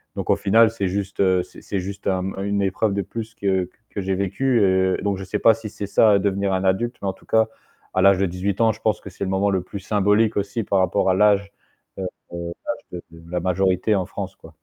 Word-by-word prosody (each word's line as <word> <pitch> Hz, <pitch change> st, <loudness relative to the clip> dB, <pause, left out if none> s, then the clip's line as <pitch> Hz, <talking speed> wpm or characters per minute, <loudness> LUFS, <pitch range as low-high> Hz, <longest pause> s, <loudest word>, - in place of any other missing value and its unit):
Donc -, -, -5 dB
au -, -, +5 dB
final, 110 Hz, +2 st, +4 dB
c'est 100 Hz, -4 st, -2 dB
juste 100 Hz, +1 st, -2 dB, 0.2 s
c'est -, -, -15 dB
c'est 100 Hz, -, -3 dB
juste 100 Hz, +2 st, -6 dB
une 95 Hz, +2 st, -1 dB
épreuve 100 Hz, +2 st, 0 dB
de 100 Hz, -, 0 dB
plus 115 Hz, -1 st, -7 dB
que 95 Hz, -2 st, 0 dB, 0.2 s
que 100 Hz, -, -3 dB
j'ai 95 Hz, 0 st, -1 dB
vécue, 115 Hz, +6 st, +1 dB
heu. 95 Hz, -1 st, +3 dB
Donc 100 Hz, -2 st, 0 dB
je 95 Hz, -, -6 dB
sais 95 Hz, -, -3 dB
pas 115 Hz, -, +6 dB
si 110 Hz, -1 st, -7 dB
c'est 100 Hz, -, -6 dB
ça 105 Hz, 0 st, +5 dB
devenir 100 Hz, 0 st, 0 dB
un 95 Hz, -, 0 dB
adulte, 95 Hz, +6 st, +1 dB
mais -, -, -1 dB
en -, -, -3 dB
tout -, -, -22 dB
cas 110 Hz, -1 st, +3 dB, 0.5 s
à 95 Hz, -, +2 dB
l'âge 100 Hz, -1 st, +6 dB
de 100 Hz, -, +2 dB
18 95 Hz, +3 st, -2 dB
ans, 115 Hz, -1 st, +5 dB
je -, -, -10 dB
pense 110 Hz, -, 0 dB
que 100 Hz, -, -9 dB
c'est 100 Hz, -, -6 dB
le 95 Hz, -, -2 dB
moment 100 Hz, +1 st, +1 dB
le 95 Hz, -, +1 dB
plus 95 Hz, +2 st, -8 dB
symbolique 105 Hz, +2 st, +2 dB
aussi 100 Hz, +3 st, -1 dB
par 100 Hz, -1 st, +1 dB
rapport 95 Hz, +1 st, +2 dB
à -, -, +3 dB
l'âge, 100 Hz, 0 st, +3 dB, 0.5 s
heu, -, -, -3 dB, 0.3 s
l'âge 85 Hz, 0 st, -6 dB
de 85 Hz, +1 st, -14 dB
la 90 Hz, -, 0 dB
majorité 95 Hz, +3 st, +1 dB
en 95 Hz, -, 0 dB
France -, -, -6 dB
quoi. -, -, -15 dB
100 Hz, 240 wpm, -22 LUFS, 95-105 Hz, 0.5 s, pas